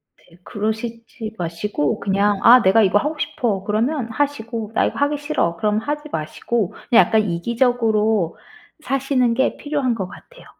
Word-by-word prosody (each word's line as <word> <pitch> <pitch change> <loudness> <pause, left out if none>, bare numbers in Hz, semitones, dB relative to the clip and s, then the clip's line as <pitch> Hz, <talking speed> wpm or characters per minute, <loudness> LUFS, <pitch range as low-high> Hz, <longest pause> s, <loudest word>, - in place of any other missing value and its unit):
네. 170 - -23
그러시지 220 +3 -5
마시고 170 -2 -2
그냥 200 +1 +1
'아 250 +1 +8
내가 210 +1 +4
이거 200 +1 +3
하고 300 +7 -1
싶어.' 235 -10 -2
그러면 230 +6 -1
하시고 230 -4 -3
'나 - - +2
이거 - - -3
하기 285 +1 +1
싫어.' 285 - -1
그럼 210 +3 +1
하지 295 +5 -4
마시고 180 +7 -2 0.2
그냥 235 - +6
약간 220 -1 +2
이기적으로 220 -1 +1 0.4
사시는 265 -3 +1
게 265 +3 0
필요한 285 -5 -1
것 190 -4 -4
같아요. - - -15
225 Hz, 335 characters per minute, -20 LUFS, 205-265 Hz, 0.4 s, 아